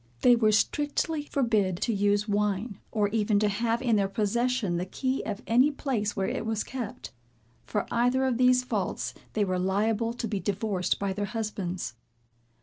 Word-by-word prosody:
They 245 - +7
were 220 -2 +3
strictly 295 +6 0
forbid 215 -9 +1
to 230 - +1
use 205 +1 +2
wine, 205 0 -1
or 210 -2 +1
even 210 -1 +1
to 210 +1 +3
have 230 +4 0
in 230 -4 +3
their 200 -1 +2
possession 220 -1 0
the 180 - -2
key 260 +7 -1
of 210 +1 -4
any 250 +5 +4
place 255 -8 -2
where 195 -1 0
it - - -2
was 220 -1 -1
kept. 245 -5 -6 0.6
For 210 - -1
either 245 +3 +2
of 255 -3 +1
these 250 0 +5
faults 215 -7 -2 0.2
they 210 -2 +1
were 185 -1 -1
liable 215 +5 +1
to 235 -1 -4
be 205 -2 -2
divorced 195 -2 -1
by 200 -1 -1
their 205 +1 -2
husbands. 195 - -4
215 Hz, 175 wpm, -28 LUFS, 200-240 Hz, 0.6 s, They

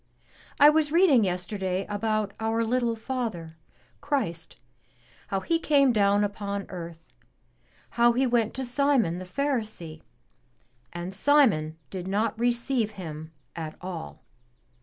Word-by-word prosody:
I 290 +1 +9
was 305 -1 +1
reading 325 - +5
yesterday 185 0 -2
about 210 -1 -1
our 225 +1 0
little 235 0 0
Father, 220 -9 -4 0.5
Christ, 260 - -2 0.7
how 195 -1 -2
He 330 - 0
came 280 -5 +4
down 205 -1 +3
upon 200 -1 -3
earth, 170 -2 -9 0.8
how 240 0 +4
He 260 +3 +2
went 235 -3 +1
to 265 - -3
Simon 245 -9 +1
the 185 - -7
Pharisee, 215 - -3 0.9
and 175 +2 -6
Simon 205 - +3
did 185 -1 -5
not 215 +3 -1
receive 240 -1 0
Him 160 -3 -7 0.2
at 160 -2 -6
all. 125 - -7
215 Hz, 120 wpm, -26 LUFS, 180-250 Hz, 0.9 s, I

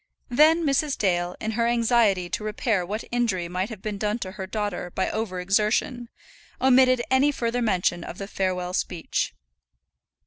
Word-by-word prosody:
Then 310 +7 +5
Mrs. 280 0 +1
Dale, 175 -2 0
in 220 - -2
her 230 +1 +1
anxiety 230 -6 +2
to 210 - -4
repair 215 -2 0
what 210 +5 -4
injury 225 -8 0
might 185 +4 -2
have 215 -5 -9
been 210 -2 -4
done 210 +1 0
to 190 -5 -5
her 190 -1 -7
daughter 205 -3 -3
by 190 +2 -2
over 210 -4 -3
exertion, 215 +5 0 0.5
omitted 255 -1 +5
any 270 +3 +4
further 245 -2 -1
mention 180 -5 +1
of 175 - -8
the 195 - -6
farewell 185 -2 -2
speech. 175 -2 -2
215 Hz, 165 wpm, -25 LUFS, 185-240 Hz, 0.5 s, Then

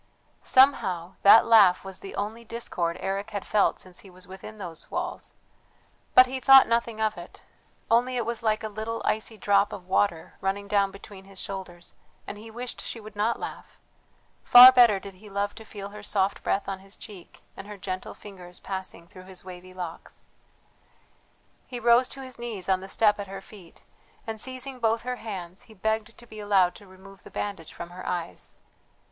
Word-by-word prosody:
Somehow 190 -10 +3
that 210 +3 +8
laugh 205 -6 +5
was 190 -1 -8
the 195 - -9
only 215 +3 -4
discord 185 -7 -3
Eric 195 +1 -3
had 200 -1 -5
felt 210 - +2
since 185 -1 -11
he 195 - -12
was 185 0 -15
within 190 +3 -10
those 175 -6 -8
walls; 355 +1 -5 0.8
but 255 - +10
he 260 +1 -5
thought 270 +1 +8
nothing 230 -1 0
of 215 -3 0
it, 175 - -13 0.5
only 245 +2 +3
it 240 - -1
was 235 -1 -3
like 215 -1 0
a - - -2
little 220 +2 -5
icy 220 +1 -1
drop 200 0 +2
of 185 - -8
water 190 -3 0
running 195 +1 -2
down 200 -1 +2
between 195 0 -13
his 195 -1 -14
shoulders 185 -3 -8 0.3
and 205 - -8
he 225 +1 -11
wished 240 +2 -7
she 230 - -6
would 215 -1 -12
not 215 +3 0
laugh; - - -8 0.7
far 250 +1 +11
better 240 -6 +5
did 195 0 -10
he 205 +3 -15
love 200 +1 -2
to 220 - -11
feel 200 -2 -8
her 210 +1 -10
soft 200 -1 -1
breath 200 - -1
on 195 -1 -4
his 195 +1 -10
cheek, 195 -5 -12
and - - -10
her 210 -1 -9
gentle 185 -1 -6
fingers 180 -3 -12
passing 190 -3 -7
through 185 0 -14
his 185 -1 -9
wavy 185 0 -10
locks. 180 -3 -8 1.4
He 245 -2 -6
rose 240 +2 +4
to 270 - -7
his 255 -2 -9
knees 225 -6 -5
on 190 -1 +1
the 190 - -9
step 210 -1 +3
at 200 - -5
her 195 0 -7
feet 195 -3 -16 0.4
and, 220 -2 -6
seizing 260 +1 -5
both 225 -1 +1
her 250 0 -3
hands, 190 -5 -7
he 220 - -14
begged 220 +3 -2
to 240 - -13
be 215 -2 -11
allowed 195 -4 +3
to 205 - -15
remove 190 0 -16
the - - -14
bandage 200 -6 -5
from 170 0 -9
her 185 +1 -9
eyes. 175 -2 -5
205 Hz, 195 wpm, -26 LUFS, 190-225 Hz, 1.4 s, far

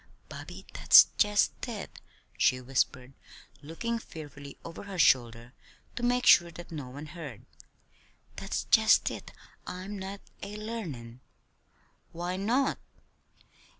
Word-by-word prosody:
"Bobby, - - -9
that's - - +8
just 210 -1 +4 0.2
it," 215 -5 -7 0.4
she 130 -1 +3
whispered, 125 0 -1 0.5
looking 230 +11 -3
fearfully 145 - -10
over 165 +4 -8
her 195 -2 -7
shoulder 120 -5 +3 0.4
to 245 - -4
make 245 +1 +1
sure 170 -1 +7
that 175 +1 -11
no 145 -6 -6
one 145 +4 -8
heard. 150 - -9 0.9
"That's - - -3
just - - +5
it - - -8 0.4
I'm 190 +3 -6
not 195 +1 -6 0.2
a 205 +1 -6
learnin'!" 165 - -6 0.9
"Why 175 +2 -3
not?" 235 +8 +1
170 Hz, 115 wpm, -29 LUFS, 135-205 Hz, 0.9 s, that's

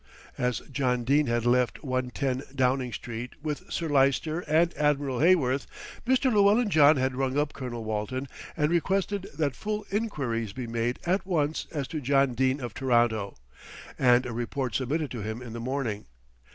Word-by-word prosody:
As 125 -3 0
John 125 -3 0
Dene 140 +4 +3
had 120 0 0
left 125 0 +2
110, 130 +1 -2
Downing 130 -1 +1
Street, 120 +1 -6
with 150 -2 -4
Sir 165 - -2
Lyster 145 +3 +2
and 165 +3 +3
Admiral 145 -4 +1
Heyworth, 145 -6 +3 0.4
Mr. 260 -1 +3
Llewellyn 205 +2 +4
John 150 -2 +6
had 130 0 0
rung 135 +1 -1
up 145 0 0
Colonel 120 -3 -5
Walton 110 +5 -3 0.3
and 150 0 +2
requested 195 +3 0
that 145 -5 0
full 210 - -3
enquiries 130 - -2
be 125 +1 -5
made 115 +1 -1
at 185 +3 +1
once 160 -5 -1
as 145 -5 -3
to 155 - -4
John 135 -1 +2
Dene 130 +3 +1
of 120 -3 -5
Toronto, 120 -6 +1 0.6
and 125 -1 +5
a 120 - -4
report 120 +1 -3
submitted 145 +3 -1
to 120 - -5
him 110 +3 -4
in 120 -3 -8
the 115 - -5
morning. 120 - -3
135 Hz, 165 wpm, -27 LUFS, 120-155 Hz, 0.6 s, John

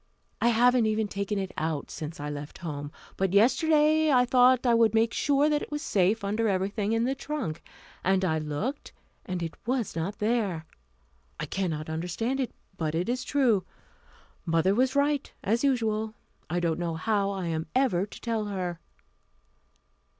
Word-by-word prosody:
I 235 - +4
haven't 240 0 +4
even 215 0 0
taken 200 +1 -3
it 190 -1 -3
out 155 -2 -2
since 155 0 -6
I 145 - -4
left 145 0 -7
home. 145 -2 -5 0.3
But 190 -1 0
yesterday 305 +7 +4
I 250 -2 +5
thought 250 0 +4
I 240 - +4
would 225 -1 +4
make 225 +1 +3
sure 285 0 +2
that 300 -1 +1
it - - -6
was 295 +1 -4
safe 200 - +2
under 215 +3 0
everything 200 +2 0
in 225 0 +2
the 260 +2 +1
trunk. 275 - -4 0.4
And 190 0 +2
I 160 -3 +1
looked, 155 - -4 0.3
and 180 -2 -3
it 165 - -4
was 245 -8 -1
not 175 +5 -3
there. 210 -7 0 0.7
I - - -2
cannot 160 -5 -2
understand 180 +11 -2
it, 255 -4 -1 0.3
but 160 -1 -2
it 175 +6 -1
is 250 +1 -1
true. 245 -9 +2 0.8
Mother 165 +3 +2
was 255 +5 +2
right, 285 0 +1
as 230 +6 +1
usual. 220 -5 0 0.3
I 175 +2 0
don't 170 -1 0
know 170 -2 -2
how 200 +3 0
I 195 -2 -3
am 160 -1 -2
ever 215 -8 +2
to - - -12
tell 225 -2 -1
her." 180 -4 -3
210 Hz, 170 wpm, -28 LUFS, 175-250 Hz, 0.8 s, I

